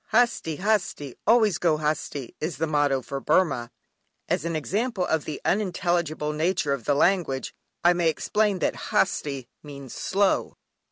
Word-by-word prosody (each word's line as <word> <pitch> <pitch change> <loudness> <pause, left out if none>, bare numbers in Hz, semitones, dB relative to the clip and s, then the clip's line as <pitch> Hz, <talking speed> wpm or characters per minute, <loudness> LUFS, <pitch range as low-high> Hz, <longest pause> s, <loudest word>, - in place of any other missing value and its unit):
"Hasti, 225 -10 +2
hasti, 185 - 0
always 215 -5 +4
go 165 -3 +2
hasti" 150 -4 -3
is 155 -3 -3
the 160 - 0
motto 145 -4 +1
for 135 +3 -4
Burmah. 145 -8 +2 0.6
As 150 - 0
an 165 -1 -1
example 195 - -1
of 160 -3 0
the 150 - -5
unintelligible 175 -6 0
nature 155 -2 +1
of 130 -5 -5
the 145 - +2
language 155 -5 +1 0.3
I 175 +1 +6
may 175 -2 +2
explain 210 +5 +1
that - - 0
"Hasti" 140 -4 0
means 140 -4 -9
"slow!" 195 0 0
160 Hz, 150 wpm, -25 LUFS, 145-185 Hz, 0.6 s, I